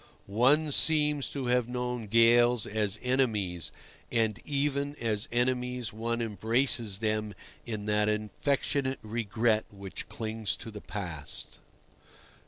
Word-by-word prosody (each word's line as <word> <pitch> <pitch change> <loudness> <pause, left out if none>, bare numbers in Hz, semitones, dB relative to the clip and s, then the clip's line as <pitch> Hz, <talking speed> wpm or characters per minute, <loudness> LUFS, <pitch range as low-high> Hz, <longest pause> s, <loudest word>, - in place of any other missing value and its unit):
One 135 +9 +3
seems 150 -1 +3
to 140 -2 -4
have 125 -1 +2
known 125 -2 -3
gales 115 +1 +5
as 105 -1 -1
enemies, 110 -10 0 0.4
and 110 -2 +1
even 140 0 -1
as 110 -5 -1
enemies 125 -1 0
one 115 +2 -2
embraces 115 -1 +1
them 110 -1 -1 0.3
in 105 -3 -4
that 105 0 +2
affectionate 130 +5 0
regret 110 0 +1
which 100 -1 -8
clings 110 -2 -3
to 115 - -8
the 105 -1 -8
past. 85 -8 -5
115 Hz, 115 wpm, -30 LUFS, 105-125 Hz, 0.4 s, gales